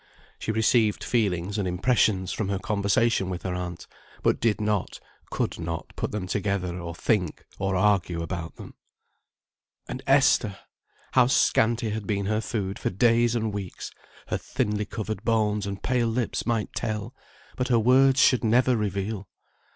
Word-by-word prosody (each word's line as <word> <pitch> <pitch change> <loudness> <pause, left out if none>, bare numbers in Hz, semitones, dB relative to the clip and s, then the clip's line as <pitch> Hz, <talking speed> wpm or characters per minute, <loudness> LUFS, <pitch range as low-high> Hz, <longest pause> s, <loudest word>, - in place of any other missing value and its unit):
She - - -2
received 110 -1 +2
feelings 100 -3 0
and 95 - -1
impressions 95 0 +1
from 105 -3 -2
her 100 - 0
conversation 100 0 +1
with 90 -1 -5
her 90 - -2
aunt, 90 -1 -5 0.4
but - - +2
did 115 -2 +1
not, 105 -2 -1 0.3
could - - -2
not, 80 0 -5
put - - -2
them 105 -3 -4
together, 95 -2 -2
or 85 -1 -6
think 95 -4 -1
or 95 0 0
argue 90 -4 +2
about 85 -1 -5
them. - - -11 1.1
And - - -5
Esther! 100 -2 +4 0.5
How 125 -2 +5
scanty 115 -2 +2
had 105 -2 -4
been 100 -1 -1
her 110 +2 0
food 105 -3 -3
for - - -1
days 120 +3 +3
and 110 -2 -1
weeks, 100 -3 -6 0.4
her - - -1
thinly 105 0 -2
covered 110 -1 -5
bones 105 -3 +1
and 100 -1 -6
pale 125 -2 +1
lips 115 +1 -2
might 115 -3 -1
tell, 110 0 -3 0.4
but 125 - -1
her 120 - +3
words 130 +3 +5
should 130 -2 +4
never 125 +3 +3
reveal! 100 -1 -3
105 Hz, 160 wpm, -26 LUFS, 95-115 Hz, 1.1 s, How